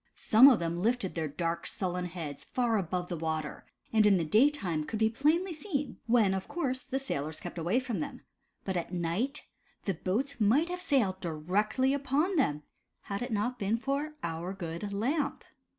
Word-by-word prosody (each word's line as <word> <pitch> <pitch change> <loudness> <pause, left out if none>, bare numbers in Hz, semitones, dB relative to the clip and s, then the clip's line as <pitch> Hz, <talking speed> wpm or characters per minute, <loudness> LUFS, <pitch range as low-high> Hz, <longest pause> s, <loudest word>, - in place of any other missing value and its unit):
Some 230 +5 +7
of 260 -5 +7
them 170 +1 -2
lifted 230 -2 +1
their 160 -2 -2
dark, 165 +3 -2
sullen 180 -1 -2
heads 165 -5 -6
far 240 -3 0
above 180 0 -2
the 175 - -3
water, 160 -2 -3 0.3
and 220 -1 +5
in 200 -2 +5
the 165 - 0
daytime 205 - +2
could 220 - -4
be 220 +1 +3
plainly 325 +9 +2
seen, 295 -3 -3
when 225 -5 +4
of 190 -1 -3
course, 260 -7 -2
the 265 +1 -3
sailors 155 - -3
kept 175 0 -6
away 175 +9 +2
from 245 -7 -3
them, 150 - -5 0.4
but 190 - -2
at 175 0 -2
night, 180 - -1 0.4
the 195 - 0
boats 230 - -2
might 265 +11 +4
have 360 0 -4
sailed 220 - +2
directly 200 - +1
upon 285 +7 +1
them, 150 - +1 0.4
had 200 +2 -4
it 245 0 -3
not 225 +4 -1
been 205 +3 +1
for 280 +5 -2
our 170 +3 -3
good 175 +1 -5
Lamp. 275 +9 -1
210 Hz, 180 wpm, -30 LUFS, 175-265 Hz, 0.4 s, Some